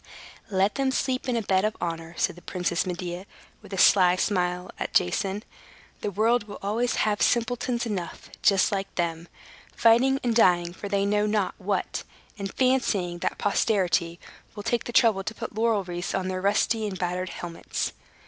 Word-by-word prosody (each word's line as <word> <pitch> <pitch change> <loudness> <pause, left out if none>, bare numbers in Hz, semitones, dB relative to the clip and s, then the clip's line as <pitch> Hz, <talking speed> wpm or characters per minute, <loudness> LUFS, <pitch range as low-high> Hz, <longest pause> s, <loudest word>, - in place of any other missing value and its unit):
"Let 195 0 +2
them 270 -1 0
sleep 260 -1 -1
in 245 - +1
the 230 - 0
bed 190 -1 +2
of 215 +1 -1
honor," 165 -1 -4
said 180 - 0
the 175 - -14
Princess 180 -1 -1
Medea, 180 +1 -5 0.3
with 205 -2 -14
a 195 - -4
sly 180 -1 +6
smile 180 -2 -1
at - - -4
Jason. 195 - +1 0.6
"The - - -2
world 220 +3 +1
will 205 - -8
always 230 +5 0
have 210 -1 +1
simpletons 240 0 +1
enough, 190 -7 -5
just 195 +1 +4
like 195 -1 -3
them, 170 -1 -2 0.5
fighting 250 +4 +4
and 235 -2 +1
dying 175 -6 +4
for 200 +2 -7
they 200 0 +1
know 210 +1 +2
not 210 -2 0
what, 200 +1 -2 0.4
and 195 -1 -4
fancying 210 -9 +1
that - - -2
posterity 185 -5 +1 0.4
will 205 - -6
take 240 +2 0
the - - -4
trouble 220 -5 +4
to 220 - -5
put - - -6
laurel 220 -2 +1
wreaths 175 0 -4
on 185 -1 -1
their 185 0 -3
rusty 210 +2 +1
and 190 -2 -5
battered 180 +1 -2
helmets. 170 -1 -4
200 Hz, 175 wpm, -26 LUFS, 180-220 Hz, 0.6 s, sly